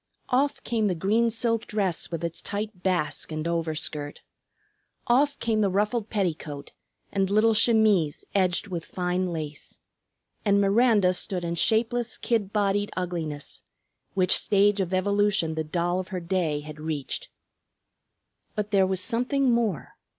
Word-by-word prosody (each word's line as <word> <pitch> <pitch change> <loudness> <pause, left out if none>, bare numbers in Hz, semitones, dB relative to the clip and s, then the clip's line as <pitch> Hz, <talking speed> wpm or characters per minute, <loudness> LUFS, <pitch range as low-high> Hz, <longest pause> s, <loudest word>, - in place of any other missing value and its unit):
Off 275 +3 +1
came 220 -3 0
the 185 - 0
green 215 +7 +2
silk 230 0 -1
dress 195 -5 -1
with 170 -1 -4
its 170 -1 -3
tight 205 -2 -4
"basque" 180 -5 -1
and 155 +1 -3
overskirt. 155 -3 -3 0.8
Off 280 +4 +3
came 220 -2 0
the 200 - +3
ruffled 210 +3 0
petticoat 160 -8 -3 0.4
and 195 -1 +1
little 215 +2 +4
chemise 215 -8 +3
edged 185 0 +1
with 175 -4 -4
fine 180 +1 -1
lace. 155 -3 -6 0.7
And 200 -1 +3
Miranda 200 -2 +4
stood 180 0 -2
in 170 0 -2
shapeless, 225 +5 +1
kid 215 -5 -1
bodied 205 -1 +1
ugliness, 165 -5 -4 0.5
which 185 -1 +4
stage 205 0 +3
of 185 -2 -1
evolution 200 -2 +1
the 160 0 -2
doll 175 +3 -1
of 185 - -4
her 185 -3 -4
day 170 -4 -1
had 150 0 -10
reached. 155 -3 -4 1.3
But 210 0 -3
there 195 -2 +4
was 190 -1 -1
something 250 +6 +1
more. 225 -9 0
195 Hz, 145 wpm, -26 LUFS, 170-215 Hz, 1.3 s, little